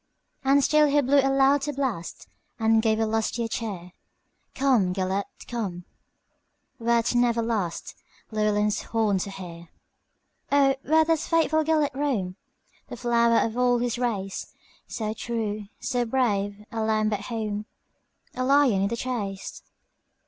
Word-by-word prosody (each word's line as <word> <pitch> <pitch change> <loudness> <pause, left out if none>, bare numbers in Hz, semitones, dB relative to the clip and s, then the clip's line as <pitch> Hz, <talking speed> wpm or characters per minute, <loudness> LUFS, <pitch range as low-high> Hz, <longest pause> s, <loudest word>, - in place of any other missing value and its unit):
And 275 +1 +4
still 305 +1 +4
he 290 +1 +3
blew 280 +1 +3
a 270 0 +3
louder 275 +2 +3
blast, 255 -11 -3 0.3
And 225 0 +3
gave 220 -1 +1
a 225 - +2
lustier 225 +1 -1
cheer:"Come, 210 +2 -3
Gêlert, 190 +1 -1 0.2
come, 190 -7 -4 0.9
wert 235 0 +1
never 240 -1 +2
lastLlewelyn's 210 +1 -2
horn 215 -4 0
to 200 - -3
hear."O, 195 +9 -3
where 315 +2 +3
doth 325 -1 0
faithful 315 -1 +2
Gêlert 305 -3 +1
roam, 250 -10 -1 0.5
The - - -8
flower 235 -1 +3
of 225 0 -4
all 245 -1 +3
his 240 0 -2
race, 200 -6 -3 0.3
So 215 -3 -3
true, 215 -3 -3
so 245 -1 -1
brave,—a 210 -3 -1
lamb 215 -1 +1
at 205 0 -4
home,A 215 +2 -7
lion 265 -6 +4
in 200 - +2
the 235 +3 -3
chase?" 210 -6 -4
230 Hz, 125 wpm, -25 LUFS, 205-265 Hz, 0.9 s, And